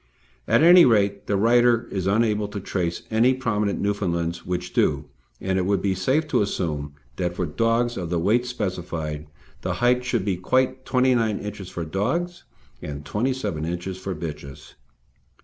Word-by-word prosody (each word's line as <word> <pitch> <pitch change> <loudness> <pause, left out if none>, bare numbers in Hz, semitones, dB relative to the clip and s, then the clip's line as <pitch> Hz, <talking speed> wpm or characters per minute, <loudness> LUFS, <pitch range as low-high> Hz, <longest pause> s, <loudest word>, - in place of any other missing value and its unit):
At - - +4
any 175 +1 +9
rate, 100 -4 +2
the 100 - +1
writer 120 +2 +4
is 95 -2 -2
unable 105 0 +2
to 100 0 -6
trace 90 -3 -3
any 120 +4 +4
prominent 105 -6 -1
Newfoundlands 85 -4 -2
which 90 0 -3
do, - - +1 0.3
and 95 0 -1
it 90 - -1
would 100 -1 +2
be 100 -1 +2
safe 130 - 0
to - - +2
assume 75 -8 -2 0.2
that 90 -1 -2
for 90 - -1
dogs 115 +8 0
of 85 -3 -4
the 90 - 0
weights 115 +8 +1
specified, 85 -8 -4 0.3
the - - -2
height 125 +1 +2
should 125 -6 -1
be 95 -3 0
quite 130 +7 0
29 125 -5 +2
inches 105 -3 -7
for 85 - -5
dogs, 150 - -2 0.4
and 70 -1 -7
27 105 - -2
inches 90 +3 -4
for 95 0 -4
bitches. 75 -3 -8
100 Hz, 165 wpm, -24 LUFS, 90-120 Hz, 0.4 s, any